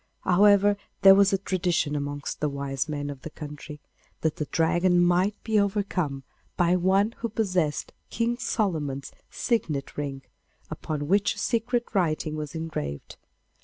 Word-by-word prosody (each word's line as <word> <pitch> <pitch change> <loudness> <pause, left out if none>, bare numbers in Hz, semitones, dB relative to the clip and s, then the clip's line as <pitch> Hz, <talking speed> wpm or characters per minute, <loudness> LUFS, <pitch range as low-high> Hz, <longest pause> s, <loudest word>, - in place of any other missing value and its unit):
However, 205 +2 +5 0.3
there 195 0 +10
was 200 0 +5
a 195 - +3
tradition 175 -5 0
amongst 145 0 -4
the 150 - 0
wise 140 +1 -3
men 145 -1 -3
of 135 -2 -10
the 160 - -7
country 150 0 -9 0.4
that 160 -1 0
the 150 - -2
Dragon 175 +3 +2
might 180 +4 +3
be 220 -2 +2
overcome 195 -9 -1 0.3
by 175 0 +3
one 190 +4 +2
who 230 - -2
possessed 185 -9 -1 0.2
King 235 +1 -1
Solomon's 155 - -2 0.2
signet 155 - -2
ring, 135 -2 -4 0.5
upon 145 -2 -4
which 200 +4 +2
a - - -16
secret 240 +1 0
writing 155 -5 0
was 150 0 -5
engraved. 155 - -5
175 Hz, 145 wpm, -26 LUFS, 145-200 Hz, 0.5 s, there